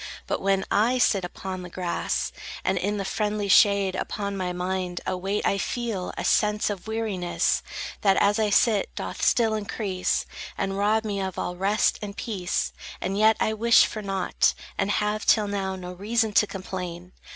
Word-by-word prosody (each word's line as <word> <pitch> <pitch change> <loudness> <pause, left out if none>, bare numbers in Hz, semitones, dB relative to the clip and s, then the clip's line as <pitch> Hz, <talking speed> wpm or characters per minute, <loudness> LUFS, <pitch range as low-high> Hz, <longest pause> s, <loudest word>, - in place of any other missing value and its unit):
But - - -2
when 195 0 +1
I 230 +5 +3
sit 205 -5 +3
upon 185 +1 -5
the 180 - -8
grass 175 0 -2 0.3
And - - +1
in 205 +1 -1
the 195 - -3
friendly 210 +1 -1
shade, 200 -1 +5
upon 200 +1 -3
my 185 -2 -2
mind 180 0 -2
A - - -1
weight 195 +3 -2
I 200 - +2
feel, 225 -7 -2
a - - -3
sense 210 0 +2
of 200 0 -7
weariness, 215 -6 0 0.4
That, 195 -2 +4
as 205 +2 +3
I 215 -1 +2
sit, 210 -1 +3
doth - - -5
still 225 -2 +3
increase 205 -3 -1 0.3
And 195 0 -1
rob 215 +2 +2
me 200 -2 -2
of 190 -1 -4
all 180 - -3
rest 195 +3 +1
and 205 -1 -6
peace. 190 -6 -2 0.3
And 195 - -2
yet 220 +1 +4
I 220 - +1
wish 230 +2 +5
for 215 - -5
nought, 195 -2 +1 0.2
And 195 0 0
have, 210 +1 0
till 215 -2 +4
now, 195 -1 -2
no 180 -1 -7
reason 220 +3 0
to 210 - +4
complain. 180 -2 -6
200 Hz, 180 wpm, -25 LUFS, 185-215 Hz, 0.4 s, shade